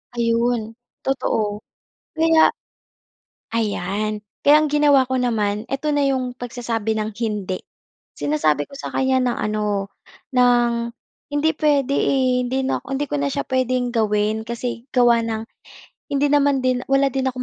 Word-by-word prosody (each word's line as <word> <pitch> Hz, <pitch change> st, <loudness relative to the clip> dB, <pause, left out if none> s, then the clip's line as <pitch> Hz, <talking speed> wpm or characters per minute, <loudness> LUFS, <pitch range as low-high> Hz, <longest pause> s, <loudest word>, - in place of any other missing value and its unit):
Ayun. 230 Hz, -1 st, 0 dB, 0.3 s
Totoo. 215 Hz, -6 st, -1 dB, 0.6 s
Kaya 325 Hz, 0 st, +5 dB, 1.0 s
ayan. 210 Hz, -1 st, -2 dB, 0.2 s
Kaya 290 Hz, +1 st, +8 dB
ang 305 Hz, -, 0 dB
ginawa 285 Hz, -3 st, +4 dB
ko 260 Hz, -, +1 dB
naman, 215 Hz, -3 st, 0 dB
eto 275 Hz, +4 st, -3 dB
na 290 Hz, -1 st, +2 dB
yung 255 Hz, -2 st, -1 dB
pagsasabi 230 Hz, -3 st, -3 dB
ng 215 Hz, 0 st, -2 dB
hindi. 210 Hz, -5 st, -3 dB, 0.5 s
Sinasabi 150 Hz, 0 st, 0 dB
ko 275 Hz, -, -10 dB
sa -, -, -7 dB
kanya 265 Hz, 0 st, +2 dB
na 250 Hz, -1 st, +1 dB
ano, 210 Hz, -2 st, -1 dB, 0.4 s
ng 240 Hz, -1 st, +2 dB, 0.4 s
hindi 290 Hz, +2 st, +2 dB
puwede, 285 Hz, -3 st, +2 dB
eh, 255 Hz, -2 st, +2 dB
hindi 260 Hz, +2 st, -1 dB
nako 265 Hz, -, -2 dB
hindi 290 Hz, +2 st, -1 dB
ko -, -, -1 dB
na 140 Hz, -, 0 dB
siya 140 Hz, -, -1 dB
puwedeng 255 Hz, -1 st, 0 dB
gawin 215 Hz, -1 st, 0 dB
kasi 235 Hz, +1 st, -4 dB
gawa 240 Hz, -2 st, +4 dB
ng 220 Hz, -1 st, -2 dB, 0.7 s
hindi 285 Hz, +1 st, +2 dB
naman 285 Hz, -2 st, +3 dB
din 255 Hz, -1 st, +1 dB
wala 275 Hz, 0 st, +3 dB
din 265 Hz, +1 st, -1 dB
akong 255 Hz, -1 st, -2 dB
245 Hz, 145 wpm, -21 LUFS, 220-265 Hz, 1.0 s, Kaya